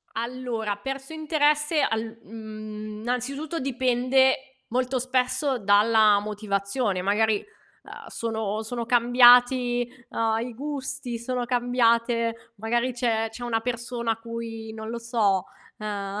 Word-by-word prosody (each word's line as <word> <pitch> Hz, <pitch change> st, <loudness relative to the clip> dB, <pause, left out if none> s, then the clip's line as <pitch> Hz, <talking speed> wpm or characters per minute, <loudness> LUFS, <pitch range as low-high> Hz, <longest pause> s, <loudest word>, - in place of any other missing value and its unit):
Allora, 230 Hz, -3 st, -3 dB
perso 270 Hz, +7 st, -6 dB
interesse 300 Hz, 0 st, +1 dB
al 225 Hz, -1 st, -1 dB
mhmm, 215 Hz, -1 st, -8 dB
innanzitutto, 275 Hz, +7 st, -3 dB
dipende 265 Hz, +1 st, +1 dB
molto 255 Hz, +2 st, 0 dB
spesso 255 Hz, +2 st, 0 dB
dalla 210 Hz, +1 st, +5 dB
motivazione, 205 Hz, 0 st, -2 dB
magari, 210 Hz, +3 st, +2 dB, 0.5 s
uhm, -, -, -11 dB
sono 220 Hz, -2 st, -3 dB
sono 235 Hz, +1 st, -4 dB
cambiati, 245 Hz, 0 st, +5 dB, 0.2 s
uhm, 225 Hz, -1 st, 0 dB
i 240 Hz, +1 st, -4 dB
gusti, 280 Hz, -1 st, -4 dB
sono 245 Hz, +1 st, -2 dB
cambiate 235 Hz, -1 st, +1 dB
magari 235 Hz, +4 st, 0 dB
c'è 230 Hz, -2 st, 0 dB
c'è 240 Hz, +2 st, -8 dB
una 225 Hz, -2 st, 0 dB
persona 235 Hz, 0 st, -2 dB
a -, -, -5 dB
cui, 225 Hz, -1 st, -7 dB
non 220 Hz, 0 st, -7 dB
lo 235 Hz, -, -4 dB
so, 220 Hz, -5 st, +1 dB, 0.3 s
uhm 205 Hz, -1 st, -4 dB
235 Hz, 120 wpm, -25 LUFS, 220-255 Hz, 0.5 s, dalla